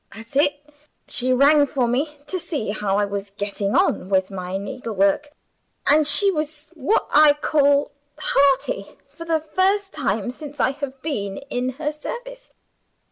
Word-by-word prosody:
"That's 225 +3 -12
it! 290 0 +1 0.4
She 255 +1 0
rang 285 +3 +5
for 260 -3 0
me, 290 +5 -1
to 370 +5 -3
see 285 - -3
how 205 -2 -1
I 205 - +2
was 200 0 -5
getting 200 0 -2
on 185 - +1
with 190 0 +1
my 185 0 -4
needlework 210 +2 -1 0.6
and 300 +1 +4
she 400 +5 +6
was 305 -2 -4
what 320 +7 0
I 300 0 +7
call 285 -1 +2 0.3
hearty, 275 -8 +1 0.2
for 335 - -8
the 325 -1 +1
first 380 +6 0
time 210 +4 -1
since 290 +1 -10
I 255 - +3
have 275 -1 -7
been 200 -11 -3
in 250 +1 -1
her 300 +3 -3
service. - - -8
280 Hz, 155 wpm, -22 LUFS, 215-305 Hz, 0.6 s, I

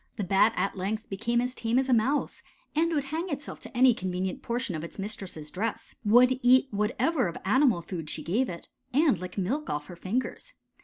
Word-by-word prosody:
The 210 - -3
Bat 195 +4 +4
at 195 - -1
length 205 +4 -3
became 230 +5 0
as 250 +1 -2
tame 230 0 0
as 265 0 +2
a 260 - +3
Mouse 260 +6 +1 0.3
and 330 +2 +2
would 295 -4 +1
hang 335 +4 -2
itself 285 -1 -5
to - - -9
any 255 0 +7
convenient 185 -3 -3
portion 235 -3 -2
of 155 - -4
its 170 - -8
mistress' 195 -7 -5
dress; 215 +4 -3
would 250 +4 +5
eat 255 +2 +5
whatever 220 - +1
of 170 - -5
animal 235 - +3
food 165 -3 -6
she - - -5
gave 230 +10 0
it, 170 -1 -8 0.3
and 285 - +4
lick 185 +2 -7
milk 255 +11 -1
off 150 0 -2
her 175 - -10
fingers. 245 - -3
225 Hz, 205 wpm, -28 LUFS, 185-260 Hz, 0.3 s, any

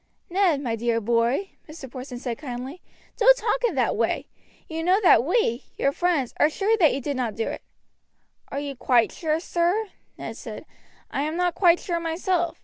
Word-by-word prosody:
"Ned, 355 -6 +2
my 235 -5 -1
dear 230 0 0
boy," 235 - +1 0.2
Mr. 305 -3 -9
Porson 255 0 -8
said 240 -2 -4
kindly, 265 +4 -6 0.4
"don't - - +6
talk - - -1
in 450 -10 +1
that 255 -3 +1
way. 230 +1 0 0.4
You 325 0 -4
know 370 +4 +4
that 240 -10 +6
we, 295 - +1
your 275 - +2
friends, 320 -6 0
are 300 - +5
sure 405 +7 +1
that 315 -6 +6
you 270 - -2
did 285 +2 -3
not 240 -4 -2
do 225 - -2
it." - - -5 0.9
"Are 280 - -4
you 285 -1 -5
quite 245 -2 +3
sure, 315 -2 -1
sir?" 355 +5 0 0.3
Ned - - -7
said. - - -8 0.5
"I - - -1
am 305 +2 -2
not 355 -1 +1
quite 350 -2 +4
sure 340 -2 -2
myself. 340 0 -1
305 Hz, 190 wpm, -25 LUFS, 250-355 Hz, 0.9 s, don't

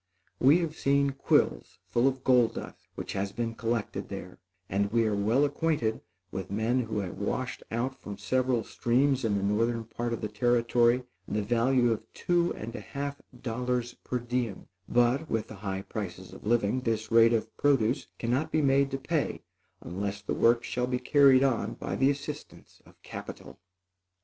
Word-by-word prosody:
We 140 +6 +6
have 160 -2 -3
seen 140 0 +3
quills - - +1
full 120 +2 +2
of 130 -1 -1
gold 125 -3 +4
dust - - -8
which - - -5
has 100 0 -2
been 115 +1 -3
collected 115 -1 -2
there, - - -8 0.3
and 100 +1 0
we 115 0 +3
are 110 - +1
well 110 +8 +3
acquainted 145 -6 0 0.3
with 95 0 -5
men 110 +5 +1
who 110 -3 -2
have 95 -3 -6
washed - - -2
out 125 +4 -2
from 100 -1 -7
several 125 +3 +1
streams 130 +2 +1
in 105 -3 +1
the 100 - -2
northern 115 +3 +1
part 120 +2 -4
of 115 - -3
the 105 - -1
Territory, 120 +2 +2 0.2
the 105 0 -1
value 120 +2 +3
of 110 0 -4
two 175 -1 +1
and 115 +2 -7
a - - -4
half 140 0 -5 0.2
dollars 125 0 -1
per 125 - -4
diem; 120 -4 -3 0.2
but, 120 +6 +2
with 110 -1 -1
the 110 - -8
high 95 -1 -4
prices 95 -4 -6
of - - -10
living, 120 +1 +2
this 115 -2 -2
rate 115 0 +7
of 110 -1 -1
produce 135 -4 +2
cannot 125 +6 -1
be 155 - +2
made 140 0 +3
to 135 - -2
pay 155 +2 -2 0.4
unless 100 +3 -4
the - - -2
work 120 0 +3
shall 125 0 -1
be 125 0 0
carried 135 0 +5
on 115 -5 0
by - - -4
the 135 +1 +3
assistance 145 +1 -6
of - - -20
capital. - - -9
120 Hz, 180 wpm, -29 LUFS, 110-130 Hz, 0.4 s, rate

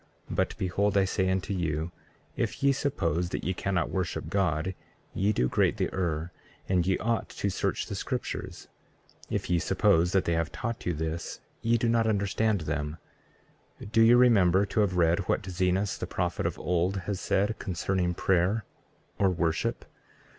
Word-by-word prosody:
But - - 0
behold, 100 +2 +1
I 95 - +4
say 95 -1 0
unto 95 +1 -1
you, 85 -2 -2 0.4
if - - -2
ye 140 - +6
suppose 90 - -1
that - - -4
ye 95 - 0
cannot 90 -2 -1
worship 95 -2 -3
God, 95 -2 0 0.4
ye 100 +2 +2
do 65 -11 +1
greatly - - +1
err, 85 -2 -2 0.4
and 90 -2 +1
ye 95 - +2
ought 115 0 -1
to 100 - -2
search - - -1
the - - -6
scriptures; - - -4 0.6
if - - -2
ye 85 -1 +2
suppose 90 0 +3
that 95 - +3
they 85 - +1
have 80 -1 0
taught 115 -4 -4
you 90 - 0
this, 80 +2 -4 0.2
ye 115 +2 +3
do 115 - 0
not 115 -1 +3
understand 105 -1 +1
them. 75 0 -3 0.8
33:3 105 - -9
Do 115 0 +4
ye 115 +1 +7
remember 100 -6 +5
to 110 - -2
have 95 -4 +2
read 85 +1 +3
what - - +1
Zenos, 95 +2 0
the - - -3
prophet - - -1
of - - -4
old, 90 +2 0
has 100 -1 -3
said 105 +3 0
concerning 90 0 -1
prayer 95 +5 +1 0.5
or 100 - +4
worship? 85 -3 -1
95 Hz, 170 wpm, -28 LUFS, 85-100 Hz, 0.8 s, ye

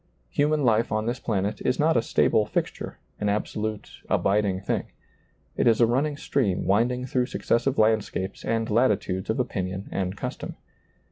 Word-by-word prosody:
Human 150 0 +2
life 115 -2 +3
on 110 0 0
this 120 +2 -2
planet 100 -2 -1
is - - +1
not - - +3
a - - +4
stable - - +2
fixture, - - -3 0.2
an 105 - -1
abso 105 +1 -1
lute, 110 -1 -4
abiding 100 -1 +2
thing. 100 - -1 0.7
It - - +2
is 115 -2 +4
a 120 - +7
running 140 +5 0
stream 105 -13 0
wind 110 +6 +3
ing 125 0 -3
through 125 -1 0
successive 130 +2 0
landscapes 110 -3 +1
and 115 0 0
latitudes 105 -5 +1
of 110 - 0
opinion 95 -5 -3
and 95 0 -2
custom. - - -5
110 Hz, 165 wpm, -26 LUFS, 100-125 Hz, 0.7 s, a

